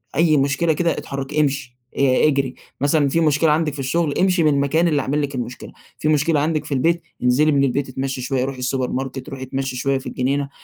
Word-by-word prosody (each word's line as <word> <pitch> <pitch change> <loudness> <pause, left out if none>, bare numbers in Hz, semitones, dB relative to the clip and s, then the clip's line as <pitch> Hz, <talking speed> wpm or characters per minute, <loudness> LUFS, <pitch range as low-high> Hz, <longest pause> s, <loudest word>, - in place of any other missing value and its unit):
أي 155 0 +4
مشكلة 140 +4 +1
كده 170 +2 +1
إتحركي، 140 +2 -4
إمشي، 135 -4 -2 0.2
آآ، 135 +1 +4
إجري، 135 -3 0 0.3
مثلًا 145 0 +2
في 165 - +1
مشكلة 155 0 +3
عندِك 155 -1 +1
في 145 - -8
الشغل، 145 +3 0
إمشي 180 -2 +3
من 150 - +4
المكان 140 +5 +2
اللي 150 -3 +1
عامل 145 +3 -1
لِك 140 -1 -3
المشكلة، 125 0 -6 0.3
فيه 155 - 0
مشكلة 155 +1 +2
عندِك 155 0 0
في 145 - -4
البيت، 165 +6 +1 0.2
انزلي 140 +5 +3
من 140 -1 +3
البيت، 135 +1 0
إتمشي 130 0 -3
شوية، 130 0 -1
روحي 135 -1 -5
السوبر 130 0 -1
ماركت، 135 +1 -4
روحي 135 -1 -7
إتمشي 135 0 -3
شوية 135 +2 0
في 135 - -10
الجنينة، 140 +2 -1
140 Hz, 215 wpm, -21 LUFS, 135-155 Hz, 0.3 s, أي